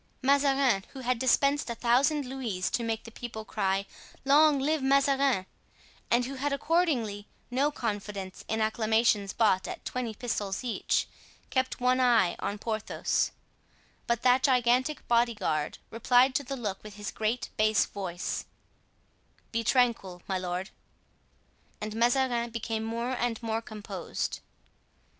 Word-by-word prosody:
Mazarin, 275 Hz, -6 st, +3 dB
who 265 Hz, -, -7 dB
had 250 Hz, -1 st, 0 dB
dispensed 275 Hz, +2 st, +2 dB
a 235 Hz, -, -3 dB
thousand 265 Hz, +5 st, +2 dB
louis 240 Hz, -8 st, -3 dB
to -, -, 0 dB
make 225 Hz, -1 st, -2 dB
the 230 Hz, -, -11 dB
people 220 Hz, -2 st, -7 dB
cry 195 Hz, -2 st, 0 dB, 0.4 s
"Long 295 Hz, +2 st, +6 dB
live 295 Hz, +3 st, 0 dB
Mazarin," 270 Hz, -5 st, +3 dB, 0.6 s
and 240 Hz, +1 st, +3 dB
who 265 Hz, -, -5 dB
had 280 Hz, +2 st, -2 dB
accordingly 275 Hz, -, 0 dB, 0.2 s
no 270 Hz, +4 st, +2 dB
confidence 205 Hz, -7 st, -5 dB
in 220 Hz, 0 st, -1 dB
acclamations 220 Hz, -2 st, +2 dB
bought 200 Hz, -5 st, +2 dB
at -, -, -7 dB
twenty 240 Hz, -3 st, -3 dB
pistoles 205 Hz, -3 st, -3 dB
each, 245 Hz, -3 st, 0 dB, 0.4 s
kept 260 Hz, -1 st, 0 dB
one 250 Hz, +1 st, +2 dB
eye 235 Hz, -8 st, +4 dB
on 205 Hz, -, -3 dB
Porthos; 215 Hz, 0 st, -1 dB, 0.8 s
but 235 Hz, -1 st, 0 dB
that 250 Hz, +1 st, +5 dB
gigantic 255 Hz, +2 st, +2 dB
body 235 Hz, 0 st, +3 dB
guard 155 Hz, -7 st, -1 dB
replied 245 Hz, +3 st, +4 dB
to 285 Hz, -, 0 dB
the 275 Hz, +1 st, -5 dB
look 205 Hz, -5 st, -4 dB
with 210 Hz, -1 st, -10 dB
his 205 Hz, -1 st, -5 dB
great 220 Hz, +3 st, -2 dB
bass 215 Hz, 0 st, +3 dB
voice, 185 Hz, -3 st, -4 dB, 1.1 s
"Be 230 Hz, 0 st, -1 dB
tranquil, 225 Hz, -7 st, +1 dB
my 190 Hz, -1 st, -1 dB
lord," 180 Hz, +2 st, -4 dB, 1.1 s
and 215 Hz, 0 st, -5 dB
Mazarin 240 Hz, 0 st, +2 dB
became 225 Hz, -1 st, -3 dB
more 230 Hz, +2 st, -2 dB
and 240 Hz, -2 st, -1 dB
more 225 Hz, 0 st, -1 dB
composed. 215 Hz, -2 st, -5 dB
235 Hz, 140 wpm, -29 LUFS, 215-260 Hz, 1.1 s, Long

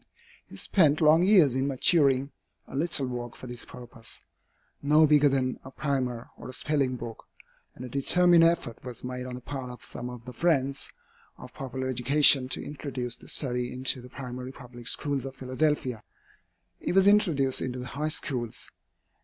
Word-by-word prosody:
He -, -, -12 dB
spent 155 Hz, -6 st, +3 dB
long 155 Hz, +1 st, +5 dB
years 180 Hz, -, +5 dB
in 130 Hz, +1 st, 0 dB
maturing 140 Hz, -1 st, +2 dB, 0.4 s
a -, -, -10 dB
little 150 Hz, -1 st, +1 dB
work 120 Hz, -1 st, -5 dB
for -, -, -11 dB
this 120 Hz, -1 st, -6 dB
purpose, 120 Hz, -2 st, -11 dB, 0.6 s
no 150 Hz, +2 st, +5 dB
bigger 150 Hz, -1 st, +5 dB
than 130 Hz, -2 st, -1 dB
a 130 Hz, -, -9 dB
primer 130 Hz, -4 st, -2 dB
or -, -, -9 dB
a -, -, -7 dB
spelling 135 Hz, -2 st, 0 dB
book, 115 Hz, -2 st, -8 dB, 0.5 s
and 125 Hz, -, -8 dB
a -, -, -6 dB
determined 170 Hz, +6 st, +4 dB
effort 165 Hz, -8 st, +1 dB
was 125 Hz, -2 st, -8 dB
made 125 Hz, 0 st, -5 dB
on 125 Hz, -, -6 dB
the 125 Hz, -, -8 dB
part 130 Hz, -1 st, -6 dB
of 125 Hz, -1 st, -10 dB
some 125 Hz, 0 st, -6 dB
of 125 Hz, -1 st, -10 dB
the 125 Hz, -, -8 dB
friends 140 Hz, -2 st, 0 dB, 0.5 s
of -, -, -12 dB
popular 130 Hz, -1 st, -5 dB
education 130 Hz, +1 st, +4 dB
to -, -, -3 dB
introduce 130 Hz, -4 st, -5 dB
the -, -, -15 dB
study 125 Hz, -3 st, -2 dB
into 130 Hz, 0 st, 0 dB
the 125 Hz, -, -12 dB
primary 125 Hz, -1 st, -7 dB
public 120 Hz, -2 st, -11 dB
schools 140 Hz, -2 st, 0 dB
of 135 Hz, 0 st, -7 dB
Philadelphia. 130 Hz, -2 st, -1 dB, 0.8 s
It -, -, -2 dB
was 195 Hz, 0 st, +6 dB
introduced 165 Hz, -11 st, +4 dB
into 130 Hz, 0 st, -3 dB
the 125 Hz, -, -6 dB
High 150 Hz, +3 st, -1 dB
Schools. 125 Hz, -7 st, -3 dB
130 Hz, 175 wpm, -27 LUFS, 125-145 Hz, 0.8 s, was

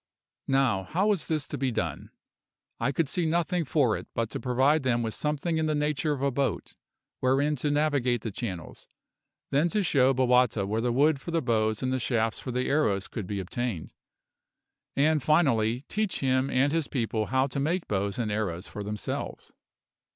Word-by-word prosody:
Now, 135 Hz, -7 st, +2 dB
how 180 Hz, -, 0 dB
was 200 Hz, -6 st, 0 dB
this 155 Hz, -2 st, -1 dB
to 145 Hz, -, -4 dB
be 135 Hz, -1 st, +1 dB
done? -, -, -3 dB, 0.7 s
I 125 Hz, +4 st, +1 dB
could 150 Hz, +2 st, 0 dB
see 165 Hz, +4 st, 0 dB
nothing 170 Hz, +1 st, 0 dB
for 130 Hz, -5 st, +2 dB
it -, -, -7 dB
but 115 Hz, -1 st, -1 dB
to -, -, -4 dB
provide 135 Hz, +4 st, +2 dB
them 120 Hz, -3 st, +1 dB
with 110 Hz, -1 st, -2 dB
something 150 Hz, +2 st, -1 dB
in 160 Hz, -, +1 dB
the 155 Hz, -, +1 dB
nature 150 Hz, +1 st, 0 dB
of 140 Hz, -2 st, -2 dB
a 140 Hz, -, +2 dB
boat 135 Hz, +1 st, -2 dB, 0.5 s
wherein 135 Hz, +4 st, +2 dB
to 145 Hz, +4 st, -1 dB
navigate 145 Hz, -5 st, +1 dB
the 110 Hz, -, -3 dB
channels, 95 Hz, -7 st, -6 dB, 0.6 s
then 150 Hz, +5 st, +3 dB
to 210 Hz, +3 st, +1 dB
show 135 Hz, -6 st, +4 dB
Bowata 125 Hz, -5 st, +3 dB
where 110 Hz, +3 st, -1 dB
the 120 Hz, +1 st, +1 dB
wood 140 Hz, +3 st, +3 dB
for -, -, -7 dB
the 165 Hz, 0 st, +1 dB
bows 110 Hz, -4 st, 0 dB
and 130 Hz, 0 st, 0 dB
the 130 Hz, -, 0 dB
shafts 115 Hz, -2 st, 0 dB
for -, -, -7 dB
the 125 Hz, +1 st, -1 dB
arrows 105 Hz, -10 st, +1 dB
could 105 Hz, -5 st, -6 dB
be 100 Hz, 0 st, -3 dB
obtained, 95 Hz, -2 st, -4 dB, 1.0 s
and 150 Hz, +2 st, +3 dB
finally 125 Hz, -7 st, +2 dB
teach 210 Hz, +7 st, -2 dB
him 130 Hz, 0 st, +2 dB
and 135 Hz, +3 st, +2 dB
his 165 Hz, -2 st, 0 dB
people 115 Hz, -4 st, -1 dB
how 130 Hz, +1 st, +2 dB
to 140 Hz, 0 st, -3 dB
make 165 Hz, +6 st, -1 dB
bows 100 Hz, 0 st, -1 dB
and 115 Hz, -3 st, -1 dB
arrows 100 Hz, -4 st, -2 dB
for 105 Hz, -, -7 dB
themselves. 105 Hz, +1 st, -5 dB
130 Hz, 190 wpm, -28 LUFS, 115-150 Hz, 1.0 s, show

